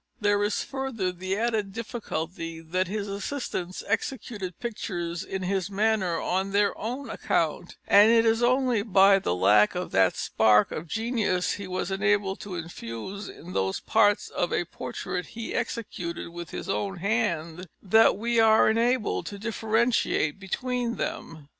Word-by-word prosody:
There 205 -1 +2
is 205 0 0
further 265 -9 -3
the 185 +2 -3
added 220 -3 -1
difficulty 170 -7 -5
that 180 +3 -1
his 205 +2 -3
assistants 200 -3 -4
executed 205 -4 -3
pictures 175 -7 -4
in 190 -1 -4
his 190 0 -1
manner 200 -4 +1
on 190 +2 -1
their 205 0 +2
own 250 +5 -5
account, 170 +2 -1
and 205 +2 +7
it 230 0 +5
is 225 +1 +3
only 250 -2 +2
by 195 -2 +5
the 90 - -1
lack 105 - +4
of 180 0 -3
that 95 -1 +3
spark 110 -1 +3
of 165 - -5
genius 220 -4 0
he 200 -2 -5
was 185 0 -3
enabled 200 0 +1
to 195 -3 -7
infuse 165 - -6
in 180 +3 -10
those 95 0 0
parts 205 -1 +2
of 175 - -2
a 175 - 0
portrait 180 +1 -5
he 230 - -4
executed 170 -7 -4
with 170 -1 -8
his - - -6
own 195 -1 -2
hand 180 -4 -1 0.2
that 220 +1 +5
we 235 +2 +1
are 220 -1 +6
enabled 235 0 +1
to 205 - -6
differentiate 220 -6 0
between 240 +4 -2
them. 155 -3 -5
200 Hz, 155 wpm, -27 LUFS, 175-225 Hz, 0.2 s, and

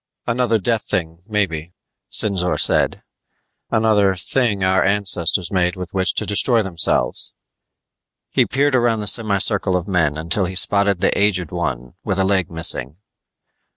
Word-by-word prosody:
"Another 120 -1 0
death 110 +2 -2
thing, 85 -1 -3
maybe," 90 -6 -3 0.4
Sinzor 95 -4 +1
said. - - +2 0.7
"Another 105 -3 +2
'thing 100 +1 -1
our 95 0 +2
ancestors 95 -3 +1
made 90 -1 0
with 90 -2 -8
which 95 0 0
to - - -1
destroy 110 +2 +3
themselves." 85 -4 0 1.0
He - - +2
peered 140 +1 0
around 120 -3 +1
the - - -5
semi 105 -2 +1
circle 95 -2 +1
of 90 +1 -6
men 80 -6 0
until 85 +5 -1
he 95 +1 -6
spotted 100 0 +2
the - - +1
aged 95 -5 0
one 65 -8 -4
with 95 -3 -2
a 95 - +1
leg 95 -3 0
missing. 80 -3 0
95 Hz, 150 wpm, -19 LUFS, 90-105 Hz, 1.0 s, destroy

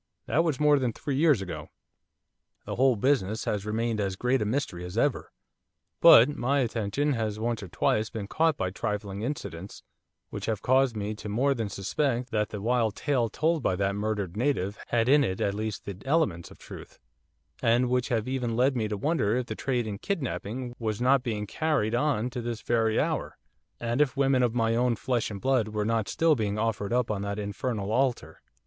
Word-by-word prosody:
That 165 - +2
was 155 -5 -1
more 150 -1 +4
than 125 -3 -1
three 140 +4 -3
years 145 -8 +3
ago. 90 - -7 1.0
The - - -4
whole 130 0 +4
business 110 -3 0
has 105 0 -2
remained 110 0 -1
as 95 -2 -1
great 125 +4 +1
a - - 0
mystery 110 - -2
as 90 +4 -7
ever. 140 +3 0 0.7
But 115 - +9
my 140 +2 +1
attention 120 +5 0
has 110 -3 -2
once 115 0 -1
or 95 - -7
twice 105 +4 0
been 110 -3 -5
caught 160 +5 +1
by 90 - -2
trifling 100 0 -4
incidents, 100 - -6 0.5
which - - -5
have 110 -3 -2
caused 130 -2 +3
me 105 +1 -2
to 105 0 -8
more 130 +7 +2
than 115 -5 -3
suspect 120 +6 -1
that 105 -1 0
the 105 -2 -6
wild 115 -3 +1
tale 130 -5 0
told 160 +6 0
by 95 - +1
that 100 +1 0
murdered 100 -3 -2
native 110 -5 -1
had 115 -1 +1
in 145 +2 +5
it 95 -7 -2
at 100 - 0
least 110 0 -4
the 100 - -5
elements 135 - 0
of - - -15
truth; - - -11 0.6
and 120 +1 +3
which 125 +1 0
have 115 -3 0
even 125 -3 -2
led 130 +3 +2
me 110 -3 0
to 105 -1 -3
wonder 125 -4 +1
if 125 - -1
the - - -5
trade 125 -3 -1
in 100 -2 -5
kidnapping 125 - -4
was 110 -2 -2
not 130 +2 +4
being 110 -5 -3
carried 140 -3 0
on 125 -2 +1
to 125 -1 -4
this 115 -1 -5
very 115 -2 +1
hour, - - -2 0.4
and 120 +3 0
if 135 -4 +1
women 135 -2 +3
of 120 -1 +1
my 115 -1 +2
own 120 0 +2
flesh 120 +1 -1
and 100 -2 -7
blood 130 -5 +2
were 105 -1 -2
not 115 -1 0
still 165 -1 +3
being 105 -6 -1
offered 105 -2 -1
up 120 -2 +1
on 100 -2 -2
that 100 0 -3
infernal 105 0 -3
altar. 130 +1 -1
115 Hz, 205 wpm, -27 LUFS, 105-130 Hz, 1.0 s, But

